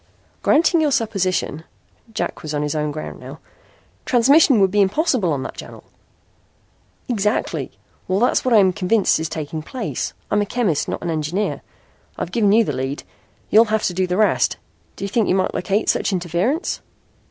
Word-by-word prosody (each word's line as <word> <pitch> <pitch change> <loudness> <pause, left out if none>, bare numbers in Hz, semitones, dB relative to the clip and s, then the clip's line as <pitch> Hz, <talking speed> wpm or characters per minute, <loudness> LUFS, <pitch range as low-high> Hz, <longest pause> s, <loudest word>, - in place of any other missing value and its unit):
"Granting 325 +2 +3
your 305 - +2
supposition," 185 - -1 0.5
Jack 220 - -4
was 155 -1 -5
on 145 - -1
his 150 - -2
own 150 -1 -1
ground 155 +1 -7
now - - -10 0.7
"transmission 265 +1 +4
would 195 -1 +3
be 205 +1 +3
impossible 215 - +1
on 140 -3 -2
that - - -7
channel." - - -10 1.2
"Exactly! 210 -2 -1 0.4
Well, 185 +1 +1
that's 245 - +2
what 255 - 0
I 230 - +6
am 190 -3 +4
convinced 200 -2 +2
is 160 -1 -3
taking 155 0 -5
place. 235 +8 -4 0.2
I'm 205 - +2
a - - 0
chemist, 205 - 0
not - - -4
an 170 - -2
engineer. 160 +6 -2 0.6
I've - - -4
given 210 -4 +2
you 225 +2 +5
the 145 - -3
lead. 135 +2 -4 0.5
You'll 220 +2 +7
have 220 0 -1
to 180 - 0
do 185 +1 0
the 180 +1 -1
rest. 215 0 +2 0.4
Do - - -8
you - - -2
think 220 +2 0
you - - +3
might 190 -1 0
locate 200 +3 -1
such - - +1
interference?" 185 - -1
200 Hz, 180 wpm, -20 LUFS, 170-230 Hz, 1.2 s, You'll